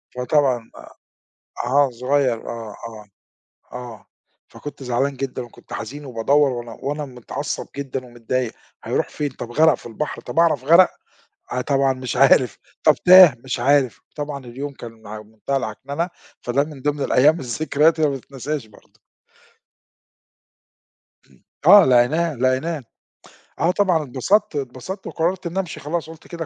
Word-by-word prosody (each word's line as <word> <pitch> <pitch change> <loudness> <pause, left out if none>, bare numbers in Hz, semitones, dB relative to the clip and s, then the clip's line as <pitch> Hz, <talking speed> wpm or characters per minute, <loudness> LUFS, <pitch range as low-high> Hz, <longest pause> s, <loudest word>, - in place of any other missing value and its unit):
فطبعًا 125 -2 +1
آآ - - -12 0.8
آه، 140 +1 +3
صُغيّر 125 -1 0
آه، 115 -3 -7
آه، 110 -2 -11 0.7
آه، 120 -5 -9 0.4
فكنت 145 -2 -10
زعلان 130 +2 -1
جدًا 130 -1 -4
وكنت 120 - -14
حزين، 140 +6 -6
وبادوَّر 135 +4 +2
وأنا 120 -2 -6
وأنا 145 +1 -3
متعصب 125 -3 -5
جدًا 135 -2 -5
ومتضايق، 120 0 -3 0.3
هيروح - - -1
فين؟ 145 -1 -3
طَب 120 -2 -8
غِرق 160 +4 +5
في - - -9
البحر، 120 +6 -5
طَب 165 - -3
أعرف 160 -6 +3
غِرق؟ 170 +5 +6 0.6
آآ 125 - -1
طبعًا 135 0 +2
مش 130 -1 -5
عارف، 130 -4 +4 0.3
طَب - - +6
تاه؟ 180 -6 +8
مش 130 -2 -3
عارف، 135 -1 +2 0.2
طبعًا 145 -2 -5
اليوم 135 +4 -6
كان 115 -4 -11
ما 105 0 -8
مُنتهى 110 +6 -4
العكننة. 140 - -3 0.3
فده 135 +4 +1
من 150 -3 -11
ضمن 145 +1 -1
الأيّام 150 +6 +4
الذكريات 150 +5 +1
اللي 155 -2 +3
متتنساش 135 0 -5
برضه. 105 - -22 2.3
امم، - - -25 0.2
آه، 200 0 +9
لقيناه، 145 +6 +3
لقيناه. 130 +5 0 0.8
آه، 165 +4 +3
طبعًا 180 -5 +2
اتبسطت 160 - +1
اتبسطت 140 +8 -5
وقررت 175 +2 -1
إن 170 +2 -6
أمشي 180 -4 -3
خلاص، 160 +2 -4
قُلت 160 -1 -13
كده 170 -2 -6
135 Hz, 145 wpm, -21 LUFS, 125-155 Hz, 2.3 s, آه